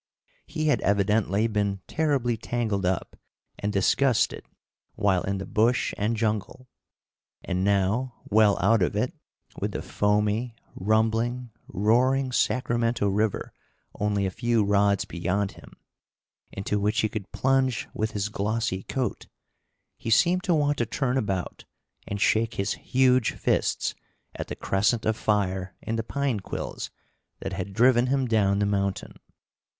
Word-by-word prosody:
He 155 Hz, -1 st, -3 dB
had 150 Hz, -, +2 dB
evidently 100 Hz, +1 st, +2 dB
been 100 Hz, -3 st, 0 dB
terribly 140 Hz, -7 st, +1 dB
tangled 110 Hz, -4 st, -1 dB
up 95 Hz, -1 st, -2 dB, 0.4 s
and 105 Hz, -, -1 dB
disgusted 115 Hz, +5 st, +2 dB, 0.5 s
while 100 Hz, -4 st, +2 dB
in 100 Hz, 0 st, -2 dB
the 95 Hz, -, -5 dB
bush 115 Hz, +3 st, +1 dB
and 110 Hz, +3 st, -1 dB
jungle, 110 Hz, +3 st, -2 dB, 0.8 s
and 90 Hz, +1 st, -1 dB
now, 100 Hz, +6 st, +1 dB
well 105 Hz, -1 st, +4 dB
out 105 Hz, +3 st, +3 dB
of 90 Hz, -, +1 dB
it, -, -, 0 dB, 0.5 s
with -, -, -2 dB
the -, -, -4 dB
foamy, 105 Hz, +3 st, 0 dB, 0.2 s
rumbling, 115 Hz, +4 st, 0 dB, 0.2 s
roaring 125 Hz, +6 st, +2 dB
Sacramento 120 Hz, -3 st, +1 dB
River 105 Hz, +1 st, -1 dB, 0.4 s
only 105 Hz, -1 st, 0 dB
a 95 Hz, -, -1 dB
few 120 Hz, 0 st, +1 dB
rods 100 Hz, -1 st, +2 dB
beyond 95 Hz, +4 st, -1 dB
him, -, -, -15 dB, 0.8 s
into 100 Hz, +1 st, -2 dB
which 105 Hz, +2 st, +1 dB
he 110 Hz, -, +2 dB
could 105 Hz, -2 st, -6 dB
plunge 130 Hz, -2 st, +1 dB
with 110 Hz, +1 st, -2 dB
his 105 Hz, 0 st, -1 dB
glossy 105 Hz, -1 st, -1 dB
coat, 130 Hz, +3 st, -3 dB, 0.7 s
he -, -, -5 dB
seemed 175 Hz, +10 st, +4 dB
to 175 Hz, -, +3 dB
want 145 Hz, -1 st, +1 dB
to 120 Hz, -, +2 dB
turn 135 Hz, 0 st, -1 dB
about 95 Hz, -8 st, -2 dB, 0.4 s
and 100 Hz, -, -3 dB
shake 115 Hz, +3 st, +2 dB
his 100 Hz, +2 st, 0 dB
huge 130 Hz, -2 st, +2 dB
fists -, -, 0 dB, 0.4 s
at -, -, -6 dB
the -, -, -5 dB
crescent 110 Hz, +4 st, +1 dB
of 110 Hz, -, +2 dB
fire 95 Hz, -3 st, -1 dB
in 115 Hz, -, -3 dB
the 115 Hz, -, 0 dB
pine 140 Hz, -1 st, -1 dB
quills 95 Hz, -, -5 dB, 0.5 s
that 95 Hz, -, -4 dB
had 95 Hz, +1 st, -4 dB
driven 120 Hz, +4 st, +4 dB
him 135 Hz, 0 st, +1 dB
down 100 Hz, -4 st, +2 dB
the 100 Hz, -, +1 dB
mountain. 100 Hz, -1 st, -1 dB
110 Hz, 145 wpm, -26 LUFS, 100-120 Hz, 0.8 s, well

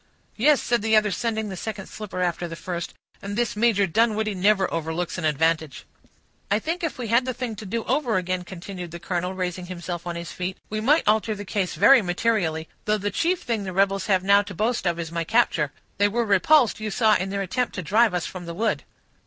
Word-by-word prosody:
"Yes," 285 Hz, +5 st, +3 dB
said 240 Hz, -2 st, +1 dB
the 220 Hz, +1 st, +2 dB
other, 215 Hz, -1 st, +3 dB
sending 220 Hz, +1 st, -2 dB
the 190 Hz, -, -5 dB
second 200 Hz, +1 st, -5 dB
slipper 205 Hz, -4 st, -6 dB
after 175 Hz, 0 st, -1 dB
the 165 Hz, -, -7 dB
first, 175 Hz, 0 st, -5 dB, 0.3 s
"and 200 Hz, +1 st, -5 dB
this 240 Hz, -3 st, 0 dB
Major 210 Hz, -2 st, +3 dB
Dunwoodie 215 Hz, +3 st, +1 dB
never 195 Hz, +1 st, +3 dB
overlooks 165 Hz, +2 st, -2 dB
an 165 Hz, -, -3 dB
advantage." 155 Hz, -1 st, 0 dB, 0.6 s
"I 205 Hz, -, +3 dB
think 330 Hz, +9 st, -3 dB
if 330 Hz, -, -2 dB
we 240 Hz, -3 st, -4 dB
had 235 Hz, +3 st, +4 dB
the 255 Hz, -2 st, -3 dB
thing 245 Hz, -4 st, -4 dB
to 210 Hz, -, -8 dB
do 230 Hz, +4 st, -2 dB
over 255 Hz, -4 st, +1 dB
again," 185 Hz, 0 st, -2 dB
continued 180 Hz, 0 st, -8 dB
the 170 Hz, +1 st, -8 dB
colonel, 180 Hz, +1 st, -2 dB
raising 180 Hz, -1 st, -3 dB
himself 175 Hz, -1 st, -6 dB
on 170 Hz, -, -3 dB
his 170 Hz, 0 st, -6 dB
feet, 180 Hz, +1 st, -4 dB
"we 215 Hz, 0 st, -2 dB
might 290 Hz, +5 st, +3 dB
alter 215 Hz, 0 st, +2 dB
the 205 Hz, 0 st, -7 dB
case 190 Hz, -3 st, -2 dB
very 235 Hz, -, +7 dB
materially, 175 Hz, -4 st, 0 dB, 0.2 s
though 215 Hz, 0 st, +2 dB
the 205 Hz, 0 st, -2 dB
chief 345 Hz, -, 0 dB
thing 225 Hz, -4 st, -1 dB
the 190 Hz, -1 st, -5 dB
rebels 195 Hz, +1 st, +1 dB
have 190 Hz, -3 st, +2 dB
now 200 Hz, +1 st, +5 dB
to 200 Hz, -2 st, -9 dB
boast 225 Hz, +1 st, 0 dB
of 170 Hz, -1 st, 0 dB
is 165 Hz, -1 st, -5 dB
my 170 Hz, 0 st, -1 dB
capture; 165 Hz, -, +2 dB, 0.3 s
they 205 Hz, -, +5 dB
were 235 Hz, +3 st, 0 dB
repulsed, 225 Hz, +6 st, +4 dB
you 215 Hz, 0 st, -3 dB
saw, 215 Hz, +1 st, +3 dB
in 190 Hz, -, -3 dB
their 200 Hz, 0 st, -2 dB
attempt 250 Hz, +6 st, -2 dB
to 185 Hz, -, -4 dB
drive 210 Hz, +4 st, +3 dB
us 175 Hz, -, -1 dB
from 180 Hz, -2 st, -7 dB
the 170 Hz, -, -5 dB
wood." 220 Hz, +3 st, 0 dB
200 Hz, 225 wpm, -24 LUFS, 180-225 Hz, 0.6 s, very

